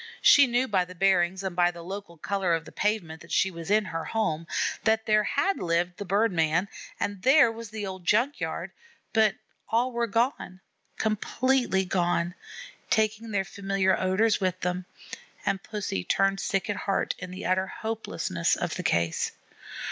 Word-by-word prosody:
She 280 -1 +8
knew 245 +2 +1
by 190 -5 +2
the 185 +1 -12
bearings 190 0 +2
and 190 -2 -3
by 175 0 +4
the 170 -1 -9
local 190 -1 -7
color 190 0 0
of 165 0 -5
the - - -11
pavement 180 -7 -1
that 170 - -13
she 195 - +2
was 170 -1 -8
in 210 +1 +3
her 165 -3 -4
home, 170 -7 -1 0.4
that 220 0 +2
there 215 -1 +4
had 390 - 0
lived 175 +1 0
the 205 - -5
bird 200 +4 +2
man, 165 +3 +1 0.3
and 205 -2 -3
there 265 0 +6
was 225 -1 -8
the 215 -1 -5
old 190 -1 -6
junk 240 +10 +2
yard; - - -4 0.4
but 220 -2 +4 0.3
all 240 +3 +2
were 235 -1 -1
gone, 230 -4 -1 0.4
completely 220 -1 +1
gone, 175 -1 0 0.6
taking 220 +1 +1
their 200 -2 0
familiar 195 -1 0
odors 200 +4 +2
with 185 -1 0
them, 180 0 -2 0.6
and 195 -1 0
Pussy 200 - -3
turned 195 - +1
sick 195 -1 -1
at 205 -1 -2
heart 195 -1 0
in 180 - -6
the 185 +1 -7
utter 185 +1 +1
hopelessness 220 - -2
of - - -3
the - - -3
case. 85 -1 0
195 Hz, 175 wpm, -27 LUFS, 180-220 Hz, 0.6 s, She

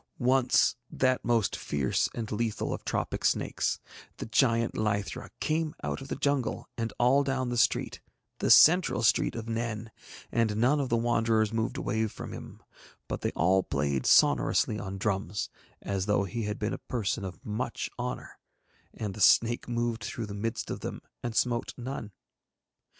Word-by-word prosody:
Once 130 -2 +3
that 130 -1 +1
most 115 -4 +1
fierce 70 -3 0
and 115 -2 -4
lethal 110 0 -1
of - - -6
tropic - - -2
snakes, - - +1 0.4
the - - -5
giant 115 0 +2
lythra, 105 -2 -2
came 155 0 -1
out - - -3
of 135 - -8
the - - -3
jungle 140 -4 -1
and 115 -1 -2
all 130 +4 +4
down 135 -2 -1
the 120 - -2
street, - - +1 0.4
the - - 0
central 165 -7 +6
street 105 - +3
of 115 -1 -5
Nen, 115 -1 -3 0.4
and 110 -3 +1
none 130 +6 +3
of 135 -3 -1
the 115 - +2
Wanderers 115 -2 +2
moved 115 0 -1
away 110 -1 0
from - - -8
him, - - -10 0.4
but - - -4
they - - 0
all 95 +3 +3
played 70 -5 -1
sonorously 105 - +4
on 95 -1 -5
drums, 100 -1 -2 0.3
as 100 -1 -2
though 105 -1 +3
he 115 +3 -3
had 105 0 -3
been 105 - -2
a - - -5
person 110 -3 -2
of 90 -4 -8
much 115 +3 -3
honour; 125 +1 -5 0.6
and 105 -3 -4
the 105 - -7
snake 120 +5 +4
moved 120 -1 -1
through 115 -1 -4
the 105 - -7
midst 110 +3 -3
of - - -4
them - - -6 0.2
and 120 -2 -4
smote 120 -1 0
none. 120 -4 -5
115 Hz, 170 wpm, -29 LUFS, 105-120 Hz, 0.6 s, central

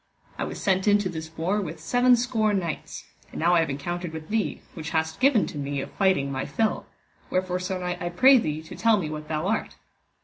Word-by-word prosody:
I - - 0
was - - -6
sent 190 +1 +1
into 205 -2 +3
this 160 -2 -6
war 190 +6 0
with 165 -3 -6
seven 245 +9 +4
score 225 -3 +1
knights, 170 -5 -4 0.3
and - - -8
now 170 +2 +3
I 175 - +5
have 165 - +1
encountered 175 +5 -4
with 160 -1 -8
thee, 220 -1 -1
which 160 -2 -6
hast 160 0 -1
given 260 -5 +4
to 150 - -6
me 140 0 -2
of - - -5
fighting 185 -9 +1
my 130 -1 -2
fill, 220 -1 -1 0.4
wherefore 185 0 0
sir 185 +1 -3
knight, 180 -1 -4
I 175 - -2
pray 260 +9 +6
thee 155 -5 -3
to 160 - -10
tell 225 -1 +3
me 155 -6 -3
what 155 0 -6
thou 155 +1 -2
art. 220 +3 -1
180 Hz, 225 wpm, -26 LUFS, 160-210 Hz, 0.4 s, pray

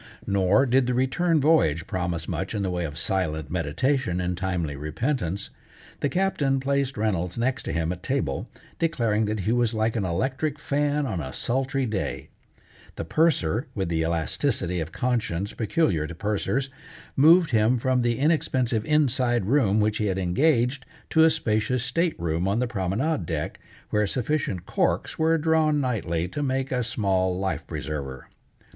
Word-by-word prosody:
Nor 100 +6 +3
did 130 0 +3
the 125 - 0
return 155 +6 +2
voyage 135 - +3
promise 90 -3 -3
much 95 +4 -3
in 100 - -1
the 95 - -1
way 90 -1 -2
of 75 -1 -6
silent 80 -4 -1
meditation 90 - 0
and 90 0 -1
timely 90 -5 -2
repentance. 95 - -2 0.5
The 145 - 0
Captain 145 -8 +1
placed 135 -1 -1
Reynolds 95 -4 -1
next 125 +3 0
to - - -2
him 80 0 -1
at 90 -1 -6
table, 85 - -2 0.3
declaring 115 -10 +1
that 105 -1 -2
he 105 - 0
was 120 -1 +1
like 110 +1 0
an 110 - 0
electric 130 - -1
fan 145 0 0
on 95 -9 -2
a 65 -2 -6
sultry 135 - -1
day; 105 -4 -3 0.7
the - - -4
Purser, 125 - +1
with 95 -4 -1
the 80 -1 0
elasticity 85 - 0
of 80 0 -4
conscience 105 -5 -1
peculiar 100 - 0
to 85 - -8
pursers, 110 +8 -1 0.4
moved 165 +3 +6
him 115 +2 +3
from 130 +1 +1
the 120 -1 +1
inexpensive 130 -6 +1
inside 130 -7 +2
room 110 -4 +3
which 105 0 +1
he 105 - 0
had 95 -1 -1
engaged, 125 - +2 0.3
to 160 - +5
a 160 - +7
spacious 115 -5 0
state 160 - 0
room 85 +2 -1
on 100 +3 +1
the 125 - +1
promenade 120 - -1
deck, 80 -4 -3 0.3
where 105 -1 +2
sufficient 125 - -1
corks - - -1
were 160 +1 +3
drawn 155 -1 +2
nightly 90 - -1
to 145 - -5
make 135 -1 -1
a 125 -1 0
small 95 -5 0
life 95 0 -2
preserver. 70 -4 -5
110 Hz, 165 wpm, -25 LUFS, 90-135 Hz, 0.7 s, a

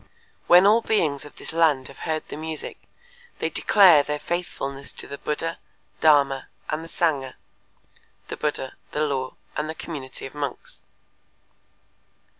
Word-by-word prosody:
When 180 +2 +8
all 215 +3 +6
beings 155 -12 +1
of 150 - -13
this - - -6
land 155 -5 +3
have 135 - -12
heard 155 -1 -1
the - - -7
music, 155 0 -6 0.6
they - - -2
declare 185 -8 +6
their 150 +1 -2
faithfulness 140 -5 -4
to - - -7
the 140 - -8
Buddha, 165 +2 -3 0.4
Dharma 140 -3 +4 0.2
and 155 +1 -2
the 165 - -10
Sangha 140 -8 0 0.9
(the - - -5
Buddha, 145 -3 -2 0.2
the 150 - 0
Law 135 -3 -1 0.2
and 150 +1 -2
the 160 - -4
community 140 -7 -6
of 135 - -8
monks)." 145 -1 -5
150 Hz, 145 wpm, -24 LUFS, 140-165 Hz, 0.9 s, When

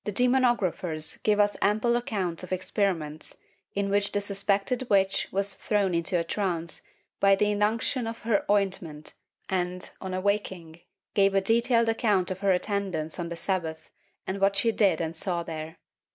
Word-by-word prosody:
The 210 - -3
demonographers 205 -10 +1
give 210 -1 +2
us 205 0 +3
ample 215 +4 +2
accounts 195 -8 -2
of 185 - -9
experiments 180 -5 -2 0.4
in 200 0 0
which 200 0 +1
the 205 - +1
suspected 200 +5 -1
witch 195 -1 +2
was 195 +1 -1
thrown 200 -1 0
into 170 +2 +1
a - - 0
trance 170 -2 -2 0.4
by 195 0 +5
the 205 +1 +1
inunction 225 +4 0
of 230 0 -6
her 220 -3 +2
ointment 185 -7 -1 0.3
and, 180 -1 -1
on 185 -1 -4
awaking, 185 -4 -2 0.3
gave 195 -1 +3
a - - +6
detailed 230 +3 +3
account 210 -5 +1
of 185 - -4
her 200 -1 +2
attendance 185 -4 -1
on 170 -1 -3
the 170 - -4
Sabbat 165 -3 -3 0.3
and 190 - -3
of - - -9
what 195 0 +3
she 230 +3 +2
did 195 -7 +2
and 165 0 -3
saw 170 0 -1
there. 160 -1 -7
195 Hz, 165 wpm, -27 LUFS, 175-210 Hz, 0.4 s, a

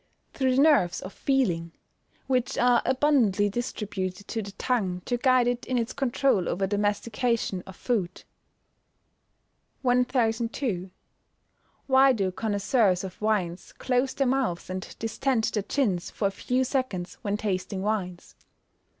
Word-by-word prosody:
_ - - -42
Through 260 -2 +1
the 270 - +4
nerves 285 - +4
of 185 - -8
feeling, 175 -12 0 0.5
which 255 -2 0
are 245 -1 +4
abundantly 250 -7 +3
distributed 205 -4 -4
to 225 - -2
the 200 -1 -7
tongue 190 -9 -1
to 245 - 0
guide 255 0 +4
it 245 0 -1
in 255 - 0
its 230 0 -1
controul 270 -7 +1
over 195 +2 0
the 205 +1 -1
mastication 215 -1 0
of 190 - -10
food. 195 -8 -2 1.6
1002. 240 -5 0 1.0
_Why 265 -1 +5
do 195 -4 0
connoisseurs 205 -1 +1
of 190 +1 -8
wines 195 -5 -1
close 255 +1 0
their 275 - +1
mouths 250 -10 -1
and 185 0 -6
distend 225 +2 0
their 210 - +1
chins 195 -5 -1
for 200 - -1
a - - -9
few 250 +6 0
seconds, 255 -9 -3
when 205 -2 -1
tasting 195 -2 -2
wines? 190 -5 -3
220 Hz, 140 wpm, -27 LUFS, 190-255 Hz, 1.6 s, Why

